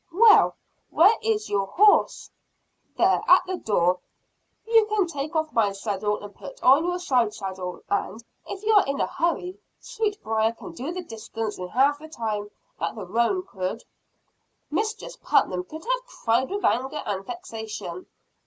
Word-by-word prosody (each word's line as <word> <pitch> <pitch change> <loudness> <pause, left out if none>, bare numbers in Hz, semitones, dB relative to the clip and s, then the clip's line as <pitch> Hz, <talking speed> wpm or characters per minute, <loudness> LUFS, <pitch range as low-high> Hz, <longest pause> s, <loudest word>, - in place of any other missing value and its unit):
"Well, 430 +5 +6 0.3
where 385 +7 +6
is 435 -1 0
your 195 -1 0
horse?" 410 - +3 0.7
"There, - - +3
at - - +7
the 370 0 -3
door. 180 - +1 0.7
You 450 -1 +5
can 425 -3 +1
take 305 -1 -5
off 315 -1 -1
my 210 -4 +2
saddle, 205 +1 -2
and 205 0 -9
put - - -11
on 275 +6 +6
your 355 0 0
side 250 - +1
saddle, 190 -2 -6
and, 210 +2 -2 0.2
if 395 +1 -7
you 440 +1 +2
are 410 - +6
in 275 0 -2
a - - +2
hurry, 360 +2 -2 0.2
Sweetbriar 410 - -1
can 345 +9 -10
do 325 -1 -5
the 365 +1 -5
distance 225 - -6
in 180 - -4
half 275 +8 +2
the 315 - -10
time 215 -8 -4 0.3
that - - -2
the 210 -4 -6
roan 235 - +1
could." 190 - -4 0.9
Mistress 435 +8 -3
Putnam 180 -1 +1
could 315 - -10
have - - -1
cried 245 - 0
with 405 +1 -2
anger 265 +5 0
and 195 -1 -3
vexation. 220 - -7
275 Hz, 160 wpm, -25 LUFS, -, 0.9 s, at